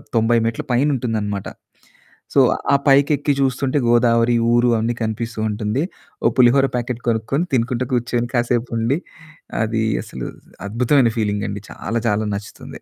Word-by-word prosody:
90 115 Hz, +1 st, +3 dB
మెట్ల 115 Hz, 0 st, -2 dB
పైనుంటుందనమాట. 115 Hz, -7 st, 0 dB, 0.9 s
సో, -, -, +4 dB, 0.3 s
ఆ -, -, +7 dB
పైకెక్కి 140 Hz, +1 st, +4 dB
చూస్తుంటే 135 Hz, +1 st, 0 dB
గోదావరి, 120 Hz, 0 st, +3 dB, 0.2 s
ఊరు 120 Hz, +1 st, +4 dB
అవన్నీ 115 Hz, +2 st, -1 dB
కనిపిస్తూ 115 Hz, +1 st, -4 dB
ఉంటుంది. 105 Hz, +6 st, -1 dB, 0.4 s
ఓ -, -, +5 dB
పులిహోర 130 Hz, +2 st, +5 dB
ప్యాకెట్టు 120 Hz, 0 st, -3 dB
కొనుక్కొని, 115 Hz, +8 st, 0 dB
తినుకుంటా 125 Hz, +1 st, 0 dB
కూర్చొని, 120 Hz, 0 st, 0 dB
కాసేపుండి 120 Hz, +1 st, 0 dB, 0.7 s
అది 110 Hz, 0 st, -1 dB, 0.2 s
అసలు -, -, -7 dB, 0.4 s
అద్భుతమైన 125 Hz, +2 st, +3 dB
ఫీలింగండి. 105 Hz, -1 st, -2 dB
చాలా 115 Hz, +1 st, -3 dB
చాలా 105 Hz, +1 st, 0 dB
నచ్చుతుంది. 105 Hz, +2 st, -9 dB
120 Hz, 120 wpm, -20 LUFS, 110-125 Hz, 0.9 s, ఆ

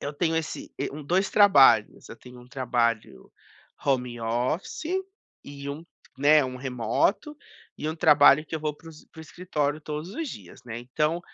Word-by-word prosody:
...eu 145 Hz, -, -5 dB
tenho 165 Hz, +2 st, -1 dB
esse 160 Hz, -1 st, -4 dB
e -, -, -2 dB
um 150 Hz, +2 st, -8 dB
2 185 Hz, +6 st, +1 dB
trabalhos. 200 Hz, -10 st, +5 dB
Eu -, -, -9 dB
tenho 125 Hz, 0 st, -14 dB
um 125 Hz, -, -17 dB
trabalho 120 Hz, -4 st, -2 dB, 0.5 s
home 125 Hz, -3 st, -1 dB
office 120 Hz, -, -2 dB, 0.6 s
e 140 Hz, 0 st, -8 dB
um, 155 Hz, +4 st, -8 dB, 0.3 s
né, 150 Hz, +1 st, +5 dB
um 130 Hz, 0 st, -5 dB
remoto 130 Hz, -, -1 dB, 0.4 s
e 155 Hz, -, -3 dB
um 160 Hz, -, -3 dB
trabalho 150 Hz, -1 st, +6 dB
que -, -, -7 dB
eu -, -, -8 dB
vou 150 Hz, -1 st, -2 dB
para 165 Hz, -, -15 dB
os 155 Hz, -, -16 dB
para -, -, -20 dB
o -, -, -8 dB
escritório 155 Hz, -3 st, -3 dB
todos 150 Hz, +3 st, -6 dB
os 325 Hz, -1 st, -4 dB
dias, 90 Hz, -, -11 dB
né. 115 Hz, -1 st, -6 dB
Então, 150 Hz, +7 st, -1 dB
145 Hz, 180 wpm, -26 LUFS, 125-160 Hz, 0.6 s, trabalho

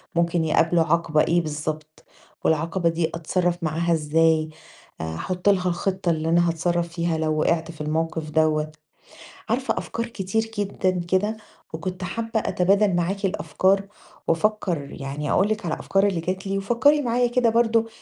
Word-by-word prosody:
ممكن 170 Hz, -1 st, +1 dB
يقابله 165 Hz, +2 st, +3 dB
عَقبة 165 Hz, -2 st, +2 dB
إيه 175 Hz, +1 st, +2 dB
بالضبط 155 Hz, 0 st, -5 dB, 0.4 s
والعَقبة 165 Hz, +3 st, +1 dB
دي 165 Hz, 0 st, 0 dB
أتصرّف 175 Hz, +1 st, -1 dB
معاها 165 Hz, +2 st, 0 dB
إزاي، 160 Hz, 0 st, +2 dB, 0.5 s
أحُط 85 Hz, -, -2 dB
لها 185 Hz, -2 st, +2 dB
الخِطة 185 Hz, +1 st, -1 dB
اللي 160 Hz, 0 st, -1 dB
أنا 170 Hz, +1 st, +4 dB
هاتصرّف 170 Hz, +1 st, 0 dB
فيها 170 Hz, -1 st, -1 dB
لو 155 Hz, -1 st, 0 dB
وِقِعت 165 Hz, +1 st, +1 dB
في 155 Hz, -, -11 dB
الموقف 160 Hz, +1 st, -2 dB
دوّة. 155 Hz, 0 st, +1 dB, 0.8 s
عارفة -, -, 0 dB
أفكار 230 Hz, 0 st, -4 dB
كتير 220 Hz, -1 st, -2 dB, 0.2 s
جدًا 200 Hz, -2 st, 0 dB, 0.2 s
كده 205 Hz, +4 st, +1 dB, 0.4 s
وكنت 180 Hz, +3 st, -4 dB
حابّة 225 Hz, +5 st, -2 dB
أتبادل 195 Hz, 0 st, +2 dB
معاكِ 190 Hz, +4 st, -1 dB
الأفكار 195 Hz, +1 st, +1 dB, 0.4 s
وأفكّر 170 Hz, -4 st, 0 dB
يعني 140 Hz, +2 st, -4 dB
أقول 195 Hz, -, +3 dB
لِك 215 Hz, -1 st, -2 dB
على 160 Hz, -, 0 dB
الأفكار 195 Hz, +1 st, +1 dB
اللي 190 Hz, -4 st, 0 dB
جات 185 Hz, +3 st, -3 dB
لي 195 Hz, 0 st, -1 dB
وفكّري 240 Hz, +9 st, +3 dB
معايا 245 Hz, -1 st, +2 dB
كده 240 Hz, -1 st, +2 dB
برضه 230 Hz, 0 st, +2 dB
175 Hz, 150 wpm, -24 LUFS, 160-195 Hz, 0.8 s, أنا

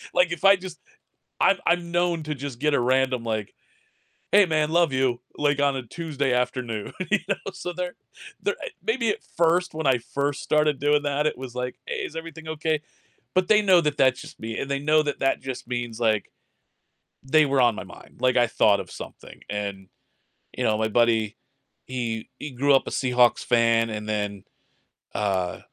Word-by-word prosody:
Like, 180 Hz, -1 st, +4 dB
if 175 Hz, -, -4 dB
I 195 Hz, 0 st, +8 dB
just 185 Hz, -3 st, -9 dB, 0.6 s
I'm 195 Hz, -, +5 dB
I'm 170 Hz, 0 st, +1 dB
known 175 Hz, -2 st, +1 dB
to 150 Hz, 0 st, -3 dB
just 135 Hz, -3 st, -6 dB
get 150 Hz, +2 st, +1 dB
a -, -, +3 dB
random 130 Hz, 0 st, +1 dB
like, 110 Hz, -3 st, -3 dB, 0.8 s
"Hey, 205 Hz, -1 st, +6 dB
man, 155 Hz, -1 st, +1 dB
love 170 Hz, -3 st, +3 dB
you," 130 Hz, -2 st, +1 dB, 0.2 s
like 145 Hz, -1 st, +1 dB
on 140 Hz, -1 st, +2 dB
a 130 Hz, -, -4 dB
Tuesday 145 Hz, -2 st, -2 dB
afternoon, 125 Hz, -3 st, -2 dB, 0.2 s
you 215 Hz, -, +4 dB
know? 195 Hz, -, +3 dB, 0.2 s
So 180 Hz, -, -5 dB
they're, 180 Hz, 0 st, -4 dB, 0.5 s
they're, -, -, 0 dB
eh, -, -, -4 dB
maybe 230 Hz, 0 st, 0 dB
at -, -, -1 dB
first 170 Hz, +1 st, +1 dB
when 160 Hz, -1 st, -3 dB
I 130 Hz, -2 st, +4 dB
first 140 Hz, +4 st, -2 dB
started 150 Hz, -2 st, +2 dB
doing 145 Hz, +1 st, +2 dB
that 145 Hz, +1 st, +1 dB
it 155 Hz, -, -2 dB
was 130 Hz, -2 st, -8 dB
like, 125 Hz, 0 st, -3 dB
"Hey, 480 Hz, 0 st, -4 dB
is -, -, -9 dB
everything 165 Hz, -1 st, -8 dB
okay?" 155 Hz, -1 st, -1 dB, 0.5 s
but 185 Hz, -1 st, +2 dB
they 215 Hz, -1 st, +6 dB
know 185 Hz, -4 st, +5 dB
that 150 Hz, -2 st, -1 dB
that's 130 Hz, -2 st, +3 dB
just -, -, -11 dB
me, 110 Hz, 0 st, -5 dB
and 140 Hz, 0 st, -3 dB
they 140 Hz, -, 0 dB
know 155 Hz, +1 st, +3 dB
that 145 Hz, -1 st, -3 dB
that 135 Hz, -, +1 dB
just 130 Hz, -2 st, -6 dB
means, 120 Hz, -2 st, -4 dB
like, 110 Hz, -3 st, +1 dB, 0.9 s
they 155 Hz, +3 st, +4 dB
were 135 Hz, -1 st, +2 dB
on 120 Hz, -3 st, +4 dB
my -, -, -6 dB
mind. -, -, -15 dB
Like, 130 Hz, -1 st, +2 dB
I 120 Hz, -1 st, +4 dB
thought 105 Hz, -2 st, +3 dB
of -, -, -12 dB
something -, -, -10 dB
and, 100 Hz, -2 st, -4 dB, 0.7 s
you 125 Hz, -, -1 dB
know, 110 Hz, -3 st, +2 dB
my 110 Hz, 0 st, +1 dB
buddy, 110 Hz, -1 st, +2 dB, 0.5 s
he 115 Hz, -3 st, -4 dB
he 150 Hz, -, -6 dB
grew 140 Hz, +3 st, +2 dB
up 135 Hz, -, +3 dB
a -, -, -1 dB
Seahawks 125 Hz, -2 st, +2 dB
fan 115 Hz, -1 st, +3 dB
and 105 Hz, -1 st, -5 dB
then, 105 Hz, -2 st, -3 dB, 0.7 s
uh, 95 Hz, -4 st, -1 dB
135 Hz, 195 wpm, -25 LUFS, 120-160 Hz, 0.9 s, I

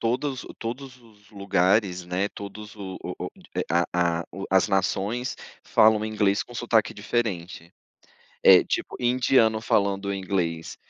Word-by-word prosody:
todos 130 Hz, +3 st, -1 dB
o -, -, -11 dB
todos 130 Hz, +2 st, -7 dB
os 105 Hz, -3 st, -22 dB
lugares, 95 Hz, -1 st, +1 dB
né, 90 Hz, +3 st, -1 dB
todos 105 Hz, +1 st, -9 dB
o 95 Hz, -2 st, -7 dB
o -, -, -5 dB, 0.4 s
a 85 Hz, 0 st, +1 dB
a -, -, -15 dB
o 95 Hz, -, -6 dB
as 95 Hz, +2 st, +4 dB
nações 100 Hz, +5 st, -1 dB, 0.3 s
falam 110 Hz, 0 st, +4 dB
inglês 105 Hz, -2 st, +1 dB
com 120 Hz, -, -14 dB
sotaque 115 Hz, -2 st, +1 dB
diferente. 95 Hz, -6 st, -3 dB, 0.7 s
Eh, 95 Hz, -2 st, +8 dB
tipo, -, -, -3 dB
indiano 120 Hz, -2 st, +3 dB
falando 100 Hz, -2 st, 0 dB
inglês, 90 Hz, -4 st, -2 dB
100 Hz, 130 wpm, -25 LUFS, 95-115 Hz, 0.7 s, Eh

